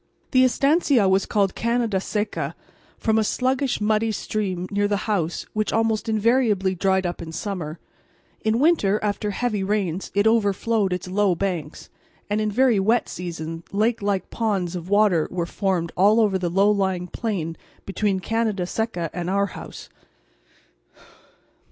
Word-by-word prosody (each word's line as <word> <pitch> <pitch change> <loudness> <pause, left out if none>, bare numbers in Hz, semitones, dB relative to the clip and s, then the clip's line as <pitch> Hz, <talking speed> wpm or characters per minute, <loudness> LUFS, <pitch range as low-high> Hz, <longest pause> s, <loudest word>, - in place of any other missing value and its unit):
The 255 0 +5
estancia 275 - +3
was 190 0 +2
called 200 -3 +1
Canada 235 -4 0
Seca, 180 -8 -3 0.4
from 220 0 +1
a - - +2
sluggish 260 +4 0
muddy 215 +1 +1
stream 190 -4 -3
near 205 0 +1
the 205 0 -1
house 175 -6 -1
which 215 0 -1
almost 225 0 0
invariably 220 -3 +2
dried 190 +1 +1
up 175 0 -3
in 165 -1 -7
summer; 170 -3 -4 0.7
in 220 +1 +2
winter 245 - +3
after 210 0 -1
heavy 210 -1 -1
rains 195 -3 -1
it 200 +1 +3
overflowed 220 -1 +2
its 180 0 -3
low 190 0 +2
banks, 170 -5 -4 0.4
and 210 +1 +1
in 215 - 0
very 245 0 +3
wet 225 +5 +2
seasons 165 -2 -5
lake 220 +3 +1
like 200 -2 -1
ponds 195 -6 -1
of 175 0 -6
water 205 -6 +3
were 175 -2 -2
formed 180 -2 -1
all 205 +5 +5
over 205 -4 +2
the 175 -1 -1
low 195 +4 +3
lying 190 -3 0
plain 180 -5 -3 0.3
between 195 0 0
Canada 215 -2 -1
Seca 180 -5 -3
and 175 0 -3
our 200 +1 +2
house. - - -9
205 Hz, 150 wpm, -23 LUFS, 185-220 Hz, 0.7 s, The